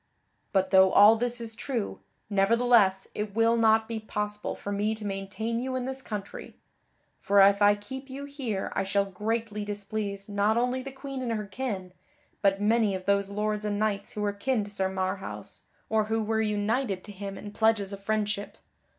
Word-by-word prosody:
"But 190 -1 +1
though 190 -1 +7
all 210 +2 +8
this 240 +1 -2
is 230 -1 -5
true, 235 -2 -3 0.3
nevertheless 205 -1 +3
it 210 -1 -4
will 230 +1 +4
not 220 -1 +4
be 230 -1 -3
possible 210 -1 -3
for 205 - -6
me 210 +2 0
to 215 -1 -8
maintain 200 +4 -3
you 260 0 -3
in 255 -1 -2
this 265 0 -4
country, 205 -5 -7 0.7
for 200 0 +3
if 200 +1 +6
I 205 0 +6
keep 265 +7 -8
you 275 +2 -6
here 260 -9 -4
I - - +1
shall 200 +1 +1
greatly 210 +2 -3
displease 205 -1 -4
not 205 +2 +1
only 250 +2 +1
the 270 +1 -7
Queen 270 0 -6
and 240 -2 -1
her 210 -1 -3
kin, 200 -4 -4 0.5
but 195 -1 +3
many 215 -1 +2
of 185 0 -6
those 200 0 +2
lords 210 +1 -1
and 205 -1 -1
knights 205 -1 -1
who 210 - -4
were 205 -1 0
kin 220 +2 0
to 205 - -9
Sir 190 -2 0
Marhaus 190 0 -4 0.2
or 220 -1 +2
who 220 +1 0
were 220 +1 0
united 210 -1 0
to 210 - -9
him 195 0 -6
in 205 - -8
pledges 210 -2 +1
of 200 0 -8
friendship. 210 -1 -2
210 Hz, 190 wpm, -28 LUFS, 200-230 Hz, 0.7 s, all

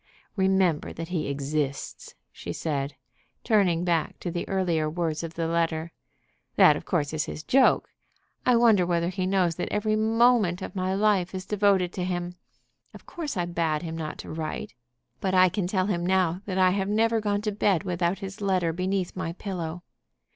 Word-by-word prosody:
Remember 190 -5 +2
that 165 +1 -6
he 175 -4 -2
exists," 140 0 -3 0.2
she - - -7
said, 140 -3 -3 0.5
turning 185 -6 +2
back 170 -3 0
to 175 - -3
the 170 0 -4
earlier 170 -5 0
words 160 -1 -2
of 165 -1 -7
the 165 - -1
letter. 165 0 -1 0.6
"That - - +7
of - - -7
course 155 -5 -1
is 155 -1 -1
his 155 - -7
joke. 265 +6 +3 0.5
I 250 - +4
wonder 230 -5 +5
whether 170 -1 0
he 185 0 -2
knows 185 -4 +1
that - - -3
every 215 +1 +1
moment 220 -4 +3
of - - -7
my 185 0 -1
life 195 -3 +1
is 185 -1 -5
devoted 195 -3 +2
to 180 - -3
him. 175 -1 -3 0.6
Of - - -13
course 315 - -5
I 175 - 0
bade 165 -3 -1
him 165 -1 -5
not 155 -2 -5
to - - -8
write. 160 -1 -5 0.5
But 190 -1 0
I 185 0 +6
can 185 0 -2
tell 185 0 0
him 180 -4 -1
now 185 -1 +1
that 190 -2 -2
I 185 -1 +5
have 195 +1 -1
never 225 +1 +2
gone 205 -1 -1
to 210 - 0
bed 200 -3 +1
without 180 0 -1
his 195 +2 -9
letter 185 -4 +1
beneath 185 +1 -2
my 180 -3 -3
pillow." 175 -3 -5
180 Hz, 185 wpm, -26 LUFS, 165-195 Hz, 0.6 s, That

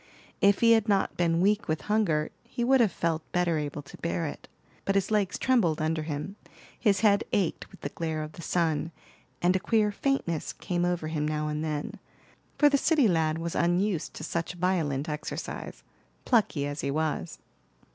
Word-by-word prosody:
If 200 0 +4
he 230 -1 +6
had 225 -1 +4
not 200 -1 +2
been 170 -1 +2
weak 210 +3 +2
with 155 0 -1
hunger 200 -8 +1
he 240 0 -4
would 260 +1 +5
have 220 -5 +3
felt 165 -1 -1
better 175 -3 +1
able 145 0 -4
to - - -13
bear 170 0 -1
it; 145 - -7 0.4
but 195 - 0
his 195 +1 +1
legs 205 -3 +1
trembled 220 -12 +2
under 155 0 0
him, 155 +6 -5 0.4
his 200 -4 +2
head 205 -1 +4
ached 190 -5 0
with - - -16
the 145 - -3
glare 160 0 -3
of 155 - -7
the 170 - -11
sun, 165 -1 0 0.5
and 180 +1 +4
a - - +2
queer 215 +1 +2
faintness 200 - -1
came 175 -1 -2
over 175 -3 -1
him 150 -2 -1
now 150 0 -1
and 150 +1 -2
then; 150 -2 -3 0.6
for 295 - +6
the 280 -1 +3
city 305 -6 +4
lad 160 -4 +1
was 165 0 -3
unused 175 +1 0
to - - -7
such 170 +2 -2
violent 170 -6 0
exercise, 150 0 -5 0.4
plucky 210 - +2
as 145 +1 -4
he - - -2
was. 150 - -2
170 Hz, 185 wpm, -28 LUFS, 155-205 Hz, 0.6 s, he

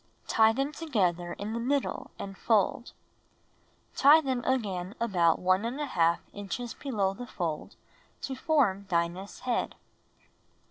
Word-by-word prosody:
Tie 220 0 +5
them 275 +5 -1
together 185 - -1
in 210 +2 -5
the 235 - -2
middle 275 +4 -1
and 195 -1 -7
fold. 220 +3 +1 1.1
2. - - -5
Tie 300 +3 +8
them 260 -4 -2
again 200 -7 -1
about 180 -8 +3
1| 185 - +1 0.2
inches 205 +4 -5
below 205 -9 -1
the 245 +4 -8
fold 165 -8 -4 0.5
to 270 - -3
form 245 -10 +1
Dinah's 175 +3 -2
head. 250 -2 -1
215 Hz, 125 wpm, -29 LUFS, 185-260 Hz, 1.1 s, Tie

